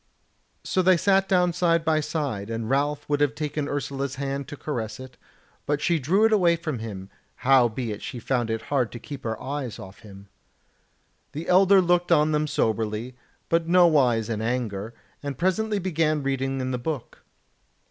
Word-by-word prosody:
So 185 - +1
they 185 0 +5
sat 195 +2 +2
down 180 -2 +3
side 170 -1 +1
by 155 -1 +3
side, 140 -10 -3
and 115 -1 -3
Ralph 145 +1 0
would 145 0 0
have 145 0 +2
taken 150 -1 -3
Ursula's 140 -1 -3
hand 140 0 -3
to 145 - -8
caress 120 -8 -4
it, 130 -1 -10 0.5
but 145 0 +1
she 165 +2 +1
drew 185 +11 +3
it 225 - +3
away 175 -5 +4
from 155 -7 -4
him; 100 -4 -7 0.2
howbeit 120 -4 +2
she 125 - -6
found 120 0 -1
it 110 0 -2
hard 125 -5 +1
to 120 - -7
keep 140 +2 -9
her 110 -2 -3
eyes 135 -3 -4
from - - -9
off 95 +2 -15
him. 100 -3 -13 1.1
The 155 +3 -6
Elder 190 +1 +6
looked 175 0 +1
on 150 +1 +4
them 150 0 +1
soberly, 110 0 -1 0.3
but 165 0 +1
nowise 150 -11 +4
in 110 -2 -3
anger, 115 -2 -3 0.3
and 140 -3 -5
presently 205 +5 0
began 160 -5 0
reading 135 0 -1
in 130 0 -2
the 125 - -2
book. 145 -1 -5
140 Hz, 180 wpm, -25 LUFS, 120-165 Hz, 1.1 s, Elder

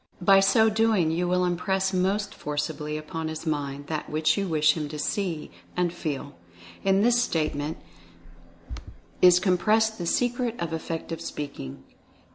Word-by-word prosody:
By 195 +1 +6
so 195 +3 +4
doing 215 -6 +2
you 175 +2 0
will 180 0 +2
impress 190 +2 0
most 195 +3 0
forcibly 150 +1 -3
upon 160 +1 -5
his 160 +1 -6
mind 145 -2 -3
that 155 0 -4
which 155 0 +2
you 200 -1 -1
wish 155 -2 +3
him 150 -3 -3
to 150 - -6
see, 165 +1 -2 0.3
and 175 -1 +1
feel. 145 -4 -4 0.5
In 195 +1 +3
this 240 +1 +4
statement 155 -5 -1 1.4
is 180 -1 +7
compressed 215 +4 +2
the 170 - -3
Secret 245 +2 0
of 165 -1 -3
Effective 165 0 -4
Speaking. 140 - -6
170 Hz, 145 wpm, -26 LUFS, 155-195 Hz, 1.4 s, is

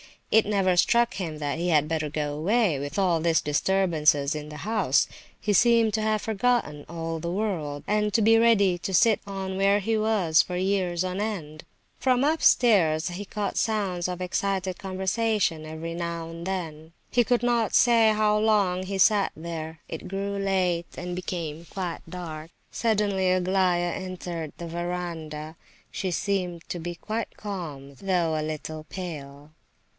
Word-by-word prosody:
It 220 - +5
never 195 -3 +2
struck 235 +5 +3
him 165 -5 -4
that 145 +1 -2
he 175 +1 0
had 150 -3 +3
better 155 -2 -1
go 150 -1 -2
away, 180 - +1
with 145 +4 -5
all 180 -4 +2
this 165 0 +3
disturbance 160 0 +2
in 150 +1 -3
the 150 - -9
house. 210 - +2 0.3
He 210 - 0
seemed 230 +1 +4
to 220 - 0
have 215 -1 +1
forgotten 220 -9 0
all 165 -1 -4
the 170 +2 -4
world, 170 -7 -2
and 210 0 +1
to 230 - +3
be 225 +1 +6
ready 200 -6 +4
to 190 - -4
sit 220 +4 +5
on 190 -1 -4
where 200 +1 +3
he 220 +2 0
was 205 -8 +3
for 180 - -5
years 185 -2 0
on 185 +1 -3
end. 165 -8 -4 0.3
From 255 -1 +2
upstairs 205 - +4
he 185 +4 -6
caught 205 0 -3
sounds 195 -6 0
of 180 0 -5
excited 190 0 -1
conversation 190 -3 0
every 160 +1 -6
now 170 -1 -4
and 165 +2 -7
then. 165 -4 -5 0.2
He 245 -1 +3
could 245 0 +1
not 235 -2 +1
say 230 -3 +5
how 210 0 +2
long 200 -4 +2
he 195 +1 -3
sat 200 +1 +4
there. 160 -1 -6
It 160 +3 -6
grew 200 +1 -3
late 185 -3 0
and 180 +1 -4
became 170 -3 -5
quite 180 -4 -4
dark. 165 -3 -7 0.2
Suddenly 205 -4 +1
Aglaya 180 -1 +1
entered 175 -4 -5
the 170 - -6
verandah. 165 -2 -5 0.3
She 190 - -2
seemed 180 -2 -2
to 175 - -3
be 175 +1 -5
quite 220 +6 -4
calm, 155 -9 -6
though 175 -1 0
a 155 - -1
little 155 0 -5
pale. 150 -5 -8
180 Hz, 165 wpm, -26 LUFS, 160-205 Hz, 0.3 s, be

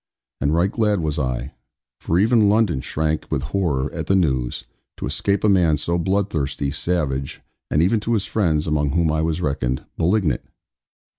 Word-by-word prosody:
And 70 +2 +1
right 85 +5 +2
glad 105 -5 +1
was 75 -2 -1
I 65 0 -3 0.5
for 85 - 0
even 110 +1 +4
London 105 -10 +2
shrank 80 +2 -2
with 70 -3 -1
horror 75 -9 0
at - - -4
the 95 - +3
news 65 -11 0 0.3
to - - -4
escape 100 -1 -1
a - - +4
man 90 -6 +4
so 85 +4 -1
bloodthirsty, 80 -7 -1
savage, 70 -5 -2 0.3
and 75 +4 +3
even 105 +5 +2
to 115 +3 -1
his 105 -2 -1
friends 85 -8 0
(among 75 -2 0
whom 85 -2 +2
I 80 0 0
was 80 +1 -1
reckoned) 65 -5 -1
malignant. 85 - +1
80 Hz, 170 wpm, -22 LUFS, 70-95 Hz, 0.5 s, even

